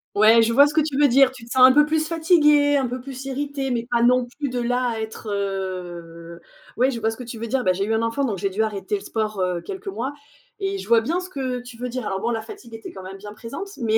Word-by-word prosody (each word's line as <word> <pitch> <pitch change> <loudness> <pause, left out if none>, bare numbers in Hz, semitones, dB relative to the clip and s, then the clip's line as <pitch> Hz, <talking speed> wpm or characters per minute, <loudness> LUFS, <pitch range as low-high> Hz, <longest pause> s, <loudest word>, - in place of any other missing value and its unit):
Ouais, 220 +2 +6
je 230 +1 +2
vois 285 +3 +8
ce 295 - -2
que 315 - +3
tu 295 -3 -1
veux 290 -2 +5
dire. 270 +1 +6
Tu 255 -3 -13
te 235 - -13
sens 260 -1 +5
un 260 - +5
peu 295 +1 +6
plus 315 0 0
fatigué, 300 -4 +4
un 265 -2 0
peu 250 +1 -5
plus 265 0 -8
irrité 275 0 -3
mais 235 -1 -1
pas 235 -1 +2
non 250 +1 +4
plus 285 +4 -5
de 250 -1 -2
là 245 0 0
à 225 - -4
être, 220 0 -7
heu, 175 -4 -5 0.4
ouais, 255 +3 +3
je 235 -4 -4
vois 220 0 +1
ce 225 - -8
que 250 - -7
tu 230 -1 -7
veux 230 +1 -5
dire. 255 +2 -1
Bah, 185 - +4
j'ai 195 +2 -2
eu 220 +2 -1
un 220 - +1
enfant, 230 +5 -1
donc 215 -7 -1
j'ai 195 +2 -1
dû 215 +4 0
arrêter 215 - -2
le 395 - -4
sport, 215 - -3
heu, 180 -1 0
quelques 385 0 -8
mois 275 -6 -3 0.4
et 390 -1 -2
je - - -8
vois 230 -1 +5
bien 335 +10 -1
ce 365 0 -7
que 260 -5 -3
tu 245 -1 -11
veux 250 +1 -5
dire 250 -2 -4
alors 190 0 -3
bon, 235 - -1
la 225 -2 -1
fatigue 230 +1 -12
était 225 - -9
quand 190 - -9
même 190 +1 -8
bien 205 +1 -10
présente 275 - -7
mais 220 -1 +2
240 Hz, 295 wpm, -23 LUFS, 220-280 Hz, 0.4 s, vois